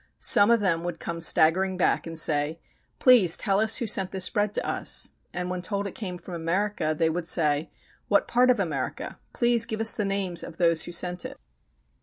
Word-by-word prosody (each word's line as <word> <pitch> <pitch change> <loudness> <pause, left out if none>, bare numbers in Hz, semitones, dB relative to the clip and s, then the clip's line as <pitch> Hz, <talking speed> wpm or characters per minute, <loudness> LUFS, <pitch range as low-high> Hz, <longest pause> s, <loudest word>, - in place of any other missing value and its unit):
Some 205 +1 +5
of 235 -2 +3
them 170 -4 0
would 175 -1 -6
come 170 0 -6
staggering 185 +4 +3
back 180 - 0
and 165 0 -8
say: 155 0 +1 0.4
"Please 235 -10 +5
tell 195 -2 0
us 220 0 +3
who 235 - -3
sent 195 -3 +1
this 190 -1 +2
bread 205 0 -1
to - - -2
us?" - - 0 0.2
And 180 0 -5
when 180 -1 -4
told 200 +2 -3
it 200 - -6
came 185 -5 -7
from 175 +1 -12
America, 170 -1 -2
they 165 - +1
would 170 0 -5
say: 155 -2 +1 0.4
"What 200 -1 +1
part 250 +1 +2
of 245 -3 +2
America? 160 -8 -5
Please 240 -1 +2
give 220 -2 -5
us 225 0 +5
the 210 - -3
names 195 -3 -1
of 165 - -10
those 170 -2 +1
who - - -8
sent 180 +1 -2
it." - - -9
185 Hz, 210 wpm, -25 LUFS, 165-205 Hz, 0.4 s, Some